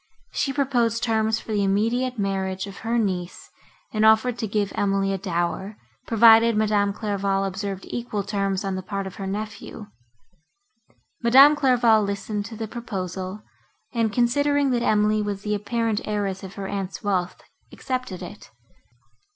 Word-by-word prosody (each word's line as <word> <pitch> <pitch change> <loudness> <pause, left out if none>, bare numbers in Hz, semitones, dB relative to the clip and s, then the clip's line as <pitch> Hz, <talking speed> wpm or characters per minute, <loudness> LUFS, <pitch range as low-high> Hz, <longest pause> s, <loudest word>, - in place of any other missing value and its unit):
She 275 - -1
proposed 245 -5 0
terms 220 -1 +1
for - - -9
the 205 -1 +1
immediate 230 +6 0
marriage 190 -1 -2
of 200 -1 -10
her 230 +1 -1
niece, 185 -5 -3 0.4
and 215 -1 +1
offered 220 +2 +5
to 220 - -2
give 205 -1 -1
Emily 195 -1 0
a - - -1
dower, 180 +3 -2 0.3
provided 225 0 +6
Madame 210 -2 +2
Clairval 200 -2 -1
observed 195 0 -4
equal 235 -4 -3
terms, 195 -1 -1
on 195 - -1
the 185 - -3
part 195 +1 -4
of 190 0 -8
her 195 - -5
nephew. 210 +1 -6 1.3
Madame 270 +5 +7
Clairval 245 -6 +4
listened 200 +1 -3
to 225 +1 -8
the 220 0 -5
proposal, 195 -3 -5 0.5
and, 230 -3 +1
considering 285 +4 +2
that 240 -1 +1
Emily 215 -1 +2
was 205 -1 -4
the 210 - -1
apparent 225 +1 -1
heiress 200 -3 -2
of 190 0 -9
her 195 -1 -5
aunt's 195 0 -5
wealth, 185 -3 -1 0.3
accepted 255 -8 -4
it. 205 - -10
210 Hz, 150 wpm, -24 LUFS, 195-230 Hz, 1.3 s, Madame